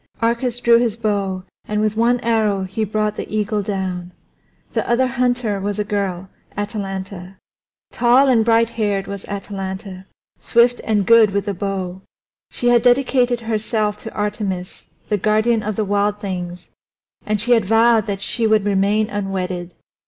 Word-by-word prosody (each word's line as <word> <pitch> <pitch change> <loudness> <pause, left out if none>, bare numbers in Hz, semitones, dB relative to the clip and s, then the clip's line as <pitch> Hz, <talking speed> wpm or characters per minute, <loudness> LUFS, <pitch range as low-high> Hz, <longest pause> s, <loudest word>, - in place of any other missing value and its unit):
Arcas 235 +1 0
drew 235 -1 +5
his 230 -2 0
bow, 200 -4 -1 0.2
and 210 0 -1
with 215 0 0
one 235 +2 +2
arrow 220 -4 +1
he 195 +4 -3
brought 215 0 -1
the - - -6
eagle 210 0 0
down. 185 -3 -4 0.6
The - - -1
other 240 +2 +3
hunter 245 -5 0
was 200 +1 -3
a 210 - 0
girl, 195 -3 -2 0.3
Atalanta. 195 -3 -5 0.5
Tall 250 +3 +4
and 240 -4 +4
brighthaired 225 -3 +1
was 200 -1 -7
Atalanta, 195 -1 -6 0.3
swift 240 +1 +3
and 210 -3 +1
good 230 -1 +6
with 200 0 -1
the 200 - -2
bow. 190 -1 -4 0.5
She 240 - 0
had 240 -1 +5
dedicated 245 -1 +2
herself 215 -1 -1
to 225 - -8
Artemis, 200 -3 -4 0.2
the 210 -2 +1
guardian 215 +3 +2
of 215 0 -3
the 215 - -1
wild 205 +1 0
things, 180 -3 -5 0.6
and 215 0 -1
she 240 +4 -1
had 230 -4 +4
vowed 225 +1 +4
that 195 -1 -3
she 230 +2 0
would 215 -2 +3
remain 205 +2 +2
unwedded. 185 -4 -4
210 Hz, 155 wpm, -20 LUFS, 195-230 Hz, 0.6 s, good